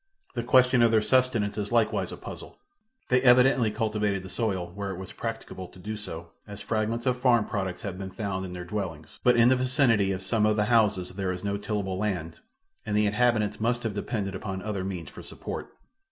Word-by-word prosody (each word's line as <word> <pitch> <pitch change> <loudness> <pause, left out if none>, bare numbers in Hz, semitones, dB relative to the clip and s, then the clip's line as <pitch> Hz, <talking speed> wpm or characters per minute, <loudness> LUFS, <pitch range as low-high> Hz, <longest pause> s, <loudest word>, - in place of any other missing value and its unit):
The - - -2
question 125 -1 +4
of 115 - +6
their 110 -1 +3
subsistence 115 -3 +2
is 105 +1 -3
likewise 115 -2 +1
a - - -7
puzzle. - - -9 0.5
They 125 0 +4
evidently 125 -2 +5
cultivated 105 -3 -1
the 95 - -9
soil 95 -7 -2
where 100 0 -4
it 95 - -4
was 95 0 -8
practicable 115 -5 -6
to - - -17
do 105 +4 -5
so 85 -5 -8 0.2
as 100 0 -8
fragments 110 +2 -1
of 125 -1 +1
farm 120 -4 +4
products 95 -4 -3
have 95 -2 -5
been 95 -1 -5
found 95 -1 -3
in 90 -1 -6
their 90 0 -6
dwellings, 85 -6 -5
but 125 -1 +5
in 120 +1 +6
the 130 - +5
vicinity 125 -6 +2
of 95 0 -3
some 105 +2 +2
of 105 - +2
the 105 -1 +2
houses 105 -5 +3
there 95 -1 -2
is 90 +1 -5
no 100 0 -1
tillable 100 -2 -3
land 90 -6 -2 0.4
and 105 - -1
the 105 - +3
inhabitants 110 0 +1
must 120 +2 +1
have 110 -3 -2
depended 100 -1 -3
upon 95 -3 -5
other 105 -3 -3
means 90 -6 -5
for - - -10
support. - - -7
105 Hz, 210 wpm, -27 LUFS, 95-115 Hz, 0.5 s, of